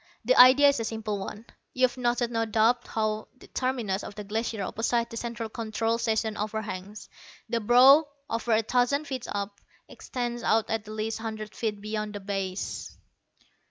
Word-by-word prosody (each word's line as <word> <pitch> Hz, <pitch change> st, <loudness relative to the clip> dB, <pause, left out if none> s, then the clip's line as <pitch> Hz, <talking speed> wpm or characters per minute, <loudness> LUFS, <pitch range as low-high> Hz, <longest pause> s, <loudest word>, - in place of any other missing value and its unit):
"The -, -, +5 dB
idea 265 Hz, +3 st, +8 dB
is 280 Hz, -, 0 dB
a -, -, -1 dB
simple 220 Hz, -2 st, -3 dB
one. 205 Hz, +3 st, -7 dB, 0.3 s
You've 255 Hz, -1 st, +2 dB
noted 240 Hz, -1 st, 0 dB
no 225 Hz, -1 st, 0 dB
doubt 225 Hz, +2 st, +2 dB
how 215 Hz, -1 st, -2 dB
the -, -, -15 dB
terminus 240 Hz, -7 st, -2 dB
of -, -, -8 dB
the 210 Hz, -, -6 dB
Glacier 220 Hz, 0 st, -2 dB
opposite 230 Hz, +4 st, -1 dB
the -, -, -7 dB
Central 235 Hz, -1 st, -4 dB
Control 225 Hz, 0 st, -2 dB
Station 220 Hz, -1 st, 0 dB
overhangs. 210 Hz, -1 st, -5 dB, 0.4 s
The 235 Hz, -, 0 dB
brow, 260 Hz, +7 st, +7 dB, 0.2 s
over 230 Hz, 0 st, -1 dB
a 220 Hz, +1 st, +3 dB
thousand 250 Hz, +6 st, +1 dB
feet 260 Hz, -4 st, -5 dB
up, 200 Hz, 0 st, -4 dB, 0.3 s
extends 240 Hz, -1 st, -5 dB
out 225 Hz, -1 st, +1 dB
at 225 Hz, -2 st, -2 dB
least 215 Hz, +1 st, -3 dB
a -, -, -9 dB
hundred 215 Hz, -2 st, -5 dB
feet 215 Hz, -3 st, -3 dB
beyond 215 Hz, 0 st, -4 dB
the -, -, -4 dB
base." 195 Hz, -1 st, -4 dB
225 Hz, 170 wpm, -27 LUFS, 215-240 Hz, 0.4 s, idea